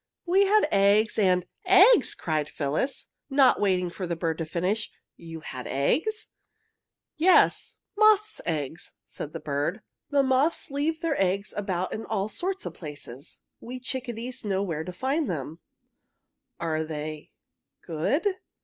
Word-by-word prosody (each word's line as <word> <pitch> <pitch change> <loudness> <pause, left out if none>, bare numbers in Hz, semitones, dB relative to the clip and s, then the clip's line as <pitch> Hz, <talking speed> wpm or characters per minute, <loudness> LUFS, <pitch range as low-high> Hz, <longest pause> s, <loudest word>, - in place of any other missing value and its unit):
"We 380 +3 +4
had 420 -5 +4
eggs 205 +2 +3
and 180 -3 +3 0.2
" - - -37 0.3
"Eggs?" - - +2
cried 155 -2 -2
Phyllis, 155 - -2 0.2
not 270 -2 +4
waiting 180 -3 +1
for 185 0 -5
the 170 - -1
bird 165 -1 -2
to 165 - -3
finish. 185 +7 -1 0.2
"You 165 -1 -9
had 130 -4 -7
eggs?" 310 - 0 0.9
"Yes, 360 +4 +4 0.2
moth's 430 0 +4
eggs," 155 -1 -3
said 150 - -7
the - - -6
bird. 150 +8 -2 0.3
"The 285 -1 +3
moths 270 +4 +1
leave 310 +4 -1
their 320 - 0
eggs 195 +2 0
about 185 -3 -2
in 220 - -5
all 205 -1 -1
sorts 380 - -3
of - - -5
places. 145 -4 -9 0.2
We 250 +2 -7
chickadees 250 -1 -5
know 195 -2 0
where 160 -5 -3
to 180 - -6
find 265 - -1
them!" 160 -1 -4 1.0
"Are 160 -1 -1
they 155 -1 -6 0.5
good?" 170 - 0
195 Hz, 145 wpm, -27 LUFS, -, 1.0 s, We